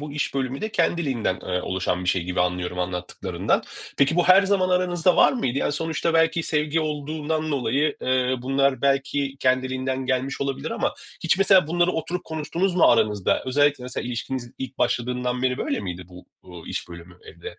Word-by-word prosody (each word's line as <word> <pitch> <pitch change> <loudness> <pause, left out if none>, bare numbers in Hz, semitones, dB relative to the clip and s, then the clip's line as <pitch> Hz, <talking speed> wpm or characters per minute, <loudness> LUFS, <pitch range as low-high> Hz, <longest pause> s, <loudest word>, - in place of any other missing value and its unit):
bu 150 -1 -7
iş 150 -1 -2
bölümü 135 0 -2
de 215 - -2
kendiliğinden, 130 - 0
ııı, 90 0 -2
oluşan 90 -1 -2
bir - - -2
şey 90 -1 +2
gibi 90 0 -2
anlıyorum 90 0 -1
anlattıklarından. 90 0 -2 0.4
Peki 140 +4 +3
bu 175 +1 +2
her 190 +2 +8
zaman 195 -2 +1
aranızda 180 -1 +2
var - - +6
mıydı? 140 - -1
Yani, - - 0
sonuçta 165 +2 -1
belki 165 0 +3
sevgi 155 +1 0
olduğundan 155 +1 -2
dolayı, 140 +2 0
eee, 130 0 +1
bunlar 135 -1 +1
belki 140 0 0
kendiliğinden 130 0 0
gelmiş 135 +1 -1
olabilir 140 +4 -3
ama 230 -2 -1 0.3
hiç 165 +2 +3
mesela 195 -4 +5
bunları 175 +2 +2
oturup 175 +2 -3
konuştunuz 165 +4 -2
mu - - +5
aranızda? 105 -4 +3
Özellikle 145 0 +2
mesela 125 -1 -5
ilişkiniz 120 0 -4
ilk 130 0 -7
başladığından 125 +1 -1
beri 125 0 +1
böyle - - -1
miydi 90 -2 -6
bu, 90 0 -14 0.2
uuu, 90 -3 -12
iş - - -5
bölümü 85 +1 -12
evde? - - -10
135 Hz, 175 wpm, -24 LUFS, 120-160 Hz, 0.4 s, her